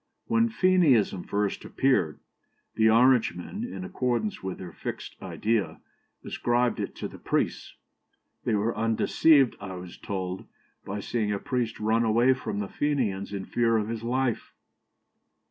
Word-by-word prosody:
"When 230 0 +2
Fenianism 165 - +3
first 100 0 -1
appeared, 110 - +1 0.5
the 110 0 +4
Orangemen, 125 - +3
in 245 -6 -5
accordance 160 - -1
with 95 -1 -4
their 90 -2 -8
fixed - - -6
idea, 110 -1 -1 0.5
ascribed 120 0 0
it - - -4
to - - -4
the - - -12
priests. - - -2 0.7
They 110 - +1
were 110 +3 0
undeceived, 125 +5 +3
I 95 -1 -6
was 90 0 -9
told, 95 -2 -4 0.4
by 100 +1 -4
seeing 110 -2 -1
a 100 - 0
priest 125 -1 -2
run 110 +2 +2
away 115 +4 +4
from 130 -5 -5
the 100 - -3
Fenians 115 -11 -1
in 100 -2 -4
fear 115 -1 +2
of 105 0 -1
his 115 -1 -3
life." 125 +1 -1
115 Hz, 145 wpm, -27 LUFS, 100-130 Hz, 0.7 s, the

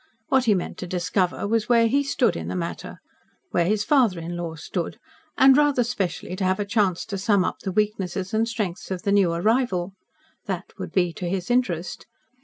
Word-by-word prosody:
What 265 -1 +3
he 215 -3 +4
meant 180 - -4
to 180 - -5
discover 180 +2 -1
was 225 +1 0
where 235 -1 +5
he 280 +5 +2
stood 250 -8 +1
in - - -5
the - - -3
matter 170 -2 -5 0.5
where 170 - +2
his 210 +1 +1
father 240 - +3
in 170 +1 -5
law 170 -2 -4
stood, 170 +5 -4 0.4
and, 265 -1 +7
rather 290 -3 +3
specially, 190 -6 -3
to 195 - -2
have 185 +1 +1
a 205 - -1
chance 200 -4 +1
to 195 - -4
sum 200 -2 +2
up - - -3
the 190 - -4
weaknesses 195 -2 -1
and 225 +1 +2
strengths 215 -4 -4
of 185 -2 -4
the 200 - 0
new 200 -4 +4
arrival. 190 0 0 0.5
That 190 -1 -4
would - - -5
be 175 -3 +1
to 175 +1 -4
his 185 +4 -2
interest. 185 -9 -1
195 Hz, 205 wpm, -24 LUFS, 180-230 Hz, 0.5 s, and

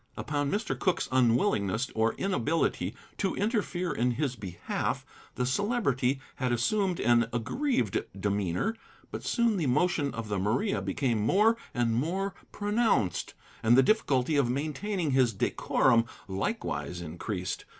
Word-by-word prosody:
Upon 145 -1 -1
Mr. 210 +7 -1
Cooke's 185 - +1
unwillingness 120 - +2
or 110 0 +1
inability 160 - 0 0.2
to 195 - 0
interfere 200 -5 -1
in 125 -1 +1
his 135 0 -1
behalf, 95 -6 -3 0.3
the 125 - 0
Celebrity 140 - +1 0.2
had 130 -2 0
assumed 185 - +1
an 120 -1 +4
aggrieved 120 - 0
demeanor, 100 - 0 0.4
but - - -5
soon 235 -3 +2
the 160 -6 0
motion 145 +1 +2
of 115 -1 -4
the 105 -2 -1
Maria 120 - 0
became 125 -6 0
more 210 - +4 0.2
and 120 -2 +1
more 180 +10 -1 0.2
pronounced, 205 - 0 0.3
and 115 +2 +5
the 135 - +7
difficulty 145 - +2
of 135 -4 +3
maintaining 155 +6 -1
his 130 -3 +3
decorum 115 +3 +2 0.2
likewise 95 -2 -3
increased. 90 +3 -4
130 Hz, 130 wpm, -29 LUFS, -, 0.4 s, the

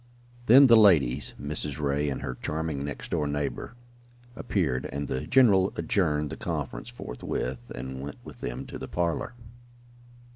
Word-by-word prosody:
Then 135 +5 +9
the 120 -3 +7
ladies, 75 - +4
Mrs. 75 -1 -4
Ray 70 0 0
and 65 - -4
her 65 - -3
charming 75 0 -3
next 70 0 -6
door 75 -3 0
neighbor, 75 - -3 0.6
appeared, 70 - -1
and 70 +1 -3
the 65 - -3
general 100 -8 +5
adjourned 75 -6 0
the - - -6
conference - - -4
forthwith, 60 - -5
and 65 +1 -6
went 70 +1 -7
with - - -12
them - - -4
to - - -8
the - - -6
parlor. 85 +6 -2
75 Hz, 150 wpm, -27 LUFS, 65-95 Hz, 0.6 s, Then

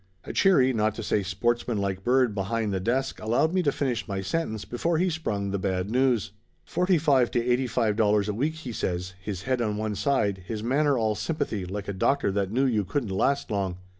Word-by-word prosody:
A - - -7
cheery, 135 -10 +4
not 110 -1 +1
to 115 - -5
say 105 - +1
sportsmanlike 100 0 -1
bird 125 -1 +3
behind 105 +1 -1
the 95 - 0
desk 130 +7 -1
allowed 120 +10 +1
me 185 - +2
to 145 -5 +2
finish 130 -5 -2
my 100 -2 -3
sentence 110 - -2
before 165 +7 -1
he 180 +2 +1
sprung 105 -11 -2
the 100 - -1
bad 95 +1 -1
news. 125 -5 +2 0.3
"Forty 180 +1 +2
five 140 -6 +3
to 120 - 0
eighty 125 +1 +2
five 110 -3 0
dollars 105 -2 +3
a 105 - -1
week," 145 +9 -1
he 160 -6 -7
says, 90 -3 -3
his 95 -1 -5
head 130 +1 0
on 105 -2 -1
one 110 0 -2
side, 105 -5 0
his 110 -2 -4
manner 140 +3 +2
all 110 -2 +1
sympathy 115 - -2
like 100 +2 -5
a 100 - -2
doctor 135 +4 +1
that 100 -1 -1
knew 130 +4 +2
you 110 -5 +1
couldn't 120 +3 -2
last 135 +9 0
long. 95 -3 -1
115 Hz, 215 wpm, -26 LUFS, 100-135 Hz, 0.3 s, cheery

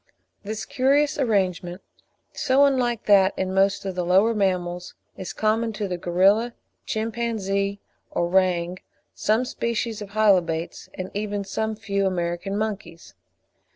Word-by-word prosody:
This 215 +1 -5
curious 280 +3 +2
arrangement, 185 -7 0 0.5
so 275 0 +3
unlike 245 -5 +1
that 195 -2 +5
in 190 0 -1
most 195 +1 +2
of 190 - -2
the 180 0 -2
lower 190 +6 +4
mammals, 180 -3 -1 0.2
is 185 - -6
common 220 +1 0
to 210 -1 -3
the 180 -1 -4
gorilla, 195 +7 +3 0.3
chimpanzee, 215 -3 -1 0.3
orang, 180 0 +1 0.3
some 220 +4 +1
species 235 -2 -2
of 205 -1 -8
Hylobates, 180 -6 +1
and 185 0 -6
even 205 0 -2
to 195 - -14
some 220 +2 -2
few 200 -2 -1
American 175 +2 -2
monkeys. 200 -6 -5
200 Hz, 130 wpm, -24 LUFS, 185-220 Hz, 0.5 s, that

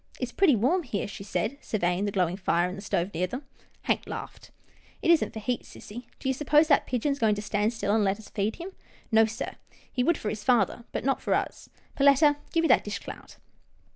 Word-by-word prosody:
" - - -21
It's 250 -2 -3
pretty 350 -5 +4
warm 270 - +2
here," 220 - -3
she 195 - -8
said, 220 +6 -2
surveying 180 -2 0
the 205 - -1
glowing 180 -3 +1
fire 180 -2 +1
in 180 - -5
the - - -8
stove 190 -1 -1
near 180 +3 0
them. 255 +10 -6 0.4
Hank - - 0
laughed. - - -7 0.3
" - - -30
It 335 - +5
isn't 335 - +3
for - - -9
heat, 245 +3 -2
sissy. 235 +4 -10
Do - - -6
you 265 - +2
suppose 295 +3 +3
that 285 - +4
pigeon 255 +3 0
is 280 - -2
going 215 -3 +3
to 205 - -4
stand 210 +1 0
still 210 -3 -1
and 220 -1 +3
let 195 0 +1
us 220 - -13
feed 210 +1 -1
him? 360 +3 -7 0.4
No, 220 0 +6
sir 225 +1 -5 0.2
— - - -28
he 250 - 0
would 340 +4 +2
for 210 - -3
his 210 0 -5
father, 235 -2 +2
but - - -4
not 270 - +1
for - - +1
us. - - -3 0.3
Perletta, 285 +1 +5
give 330 - +2
me - - +3
that - - +5
dish 205 -1 -4
clout." - - -10
225 Hz, 245 wpm, -27 LUFS, 205-275 Hz, 0.4 s, No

